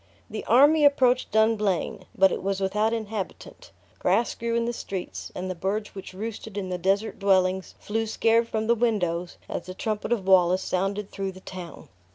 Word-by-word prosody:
The 215 - -4
army 290 +6 +5
approached 260 -3 +4
Dumblane; 215 -4 +1
but 190 -1 +5
it - - -3
was 195 0 -1
without 210 +3 +1
inhabitant; 220 -3 -5 0.3
grass 200 +6 +2
grew 230 0 -2
in 235 0 +1
the 240 - -1
streets; 190 -5 -6
and 185 - -4
the 185 - -2
birds 200 +4 -3
which 195 -1 -9
roosted 220 0 -6
in 190 -2 -3
the 180 -1 -3
desert 195 +4 0
dwellings 190 -1 +2
flew 225 +1 -2
scared 230 +1 +2
from 220 -1 -2
the 235 - +4
windows 180 -7 -1
as 175 - -5
the 185 - -7
trumpet 215 +1 -3
of 220 -6 0
Wallace 185 -1 +4
sounded 195 +2 -2
through 195 -1 -4
the 185 - -12
town. 180 -3 -9
205 Hz, 185 wpm, -26 LUFS, 185-225 Hz, 0.3 s, army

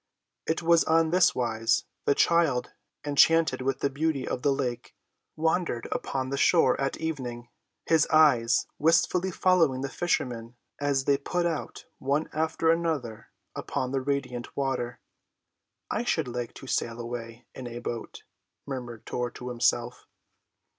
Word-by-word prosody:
It 160 +1 -1
was 170 0 +5
on 160 0 +3
this 180 0 +4
wise: 115 -2 +1 0.2
the 140 - +3
child, 155 -8 +2 0.3
enchanted 145 -1 +4
with 135 0 -1
the 140 - +2
beauty 145 -1 -1
of 125 - -3
the 145 - +2
lake, 130 -3 -3 0.4
wandered 160 -6 0
upon 130 -1 -2
the 140 - -1
shore 140 -4 +4
at 135 - -1
evening, 125 -7 -5 0.4
his 160 -2 +3
eyes 125 -7 +4
wistfully 165 +4 +3
following 170 -8 +2
the 135 - -3
fishermen 120 -8 -2 0.2
as 140 -2 0
they 140 -1 +3
put 175 +5 -1
out 165 -3 -3
one 140 +4 -1
after 160 +1 +1
another 155 -10 -2 0.3
upon 130 -1 -3
the 135 -1 0
radiant 130 -3 -3
water. 135 -3 -2 0.9
"I - - 0
should 160 - 0
like 120 -1 -5
to - - -10
sail 115 -2 -2
away 115 -1 -7
in 130 - -7
a 120 0 -7
boat," 120 -1 -6 0.4
murmured 120 -5 -6
Tor 125 0 -2
to 125 +1 -8
himself. 120 0 0
135 Hz, 145 wpm, -27 LUFS, 120-160 Hz, 0.9 s, was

